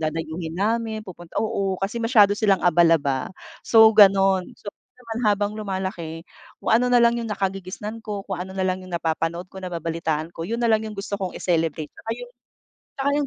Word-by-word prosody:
dadayuhin 160 +1 -4
namin, 220 +1 -1
pupunt 175 -2 -11
oo, 195 -3 -1
kasi 205 +5 -3
masyado 215 -4 +5
silang 205 -3 +2
abala, 170 -1 +5
ba. 140 -3 -2 0.3
So, 220 -1 +6
ganon. 195 -3 +5
So, 205 - -9
yun - - -75
naman, 225 0 -5
habang 205 0 +1
lumalaki, 190 -6 -5 0.4
kung - - +1
ano 245 +2 +4
na 245 - +4
lang 235 0 +4
yung 230 - -5
nakagigisnan 195 +2 -4
ko, 205 -2 -5
kung 190 -3 -5
ano 190 +1 -6
na 190 - 0
lang 185 0 -1
yung 185 - -11
napapanood 165 +2 -2
ko, 190 - -8
nababalitaan 165 -2 -3
ko, 165 +1 -6
yun 230 +1 -2
na 240 - +1
lang 220 -1 +4
yung 215 -2 -7
gusto 200 +1 -4
kong 185 -2 -3
i-celebrate. 160 -3 -1
Tsaka 225 - -7
yung, 245 0 -9 0.7
tsaka 275 +1 0
yung 290 -1 0
195 Hz, 195 wpm, -23 LUFS, 170-220 Hz, 0.7 s, So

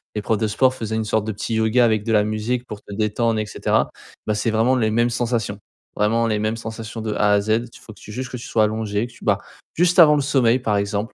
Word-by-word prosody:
les 105 - -1
profs 110 +1 0
de 110 - 0
sport 130 +5 +2
faisaient 110 -4 -4
une 110 - 0
sorte 110 0 0
de 110 - -3
petit 110 +3 -3
yoga 110 +3 +3
avec 110 -3 +2
de 115 - 0
la 105 -1 +4
musique 110 +4 -2
pour 105 -4 -8
te 100 - -11
détendre 110 +2 0
et 110 - -1
cetera. 105 - 0 0.4
Bah, 105 - 0
c'est 110 +2 0
vraiment 115 +4 +2
les 110 -3 +1
mêmes 120 +2 +2
sensations. 120 -3 -2 0.4
Vraiment 115 +3 +2
les 110 -2 0
mêmes 110 +1 -1
sensations 115 0 -7
de 110 -1 -3
A 105 0 +2
à 100 - +3
Z. 105 - -7 0.2
Il - - -14
faut - - -12
que - - -20
tu 105 - -11
juste 130 +2 -5
que 125 - -5
tu 120 - -9
sois 110 - +2
allongé, 105 0 -1
que - - -17
tu - - -15
bah, 100 -2 +3 0.4
juste 175 +2 +2
avant 150 -3 +8
le 145 - +1
sommeil, 130 -3 +2
par 105 -5 0
exemple. 100 +3 -2
110 Hz, 275 wpm, -21 LUFS, 105-120 Hz, 0.4 s, avant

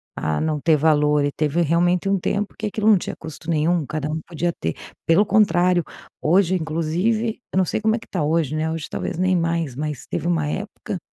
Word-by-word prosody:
a 80 -1 -1
não 155 -1 0
ter 160 -2 +4
valor. 150 -1 +3
E 145 - 0
teve 155 +3 0
realmente 175 +3 +2
um 195 -1 +2
tempo 205 +3 -2
que 215 - -3
aquilo 210 +1 -1
não 210 -3 +7
tinha - - -5
custo 160 +1 -8
nenhum 160 0 +1
cada 155 0 -3
um 160 +1 -2
podia 170 0 -1
ter 80 0 -2 0.3
pelo 190 +6 +5
contrário, 185 -4 +3 0.4
hoje, 185 +3 +3
inclusive 180 +9 -1
eu - - 0
não 185 - +4
sei 215 - -2
como 220 +1 +2
é - - -3
que - - -14
está 175 -6 -2
hoje, 155 -1 +1
né, 160 +1 -1
hoje 160 -2 -4
talvez - - -4
nem 185 0 +2
mais, 165 -5 -1
mas 150 -2 -4
teve 170 - -3
uma 165 -4 +1
época 200 +2 -4
165 Hz, 215 wpm, -22 LUFS, 155-185 Hz, 0.4 s, não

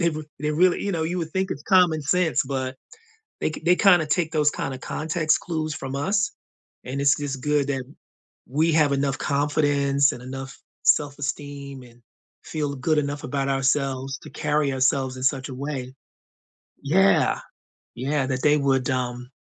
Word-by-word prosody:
They 170 -1 +3
r 155 - -4 0.2
they 150 - 0
really 180 +4 +3
you 200 - -1
know? 160 -2 -1
You 175 +3 -2
would 165 -2 -3
think 190 0 -1
it's 145 - -4
common 175 -5 +4
sense, 165 +2 +2
but 130 -1 -3 0.6
they - - 0
k 155 - -8
they 180 +1 +5
kinda 180 -6 +5
take 160 0 0
those 150 -2 +3
kinda 130 -3 -4
context 155 +2 0
clues 155 -2 -3
from 135 -1 -6
us. 200 +9 0 0.5
And 135 +2 -3
it's 140 -1 +4
just 140 -2 -4
good 150 -1 +1
that 135 -2 -2 0.6
we 155 +5 +2
have 150 -3 +4
enough 140 0 0
confidence, 140 -1 +2
and 120 - -8
enough 135 +1 -7 0.3
self-esteem, 140 -1 -1
and 120 0 -19 0.4
feel 145 -2 -3
good 155 +4 +1
enough 145 0 -2
about 135 +1 -2
ourselves 135 0 0
to - - -11
carry 150 -1 0
ourselves 130 0 +1
in 130 - -7
such 135 0 +1
a 130 - -7
way. 130 -2 -5 0.9
Yeah. 190 +7 +3 0.6
Yeah, 135 +2 -1
that 130 -1 -2
they 150 0 +5
would, 135 -2 +1
um, 125 -1 -2
140 Hz, 170 wpm, -24 LUFS, 135-155 Hz, 0.9 s, they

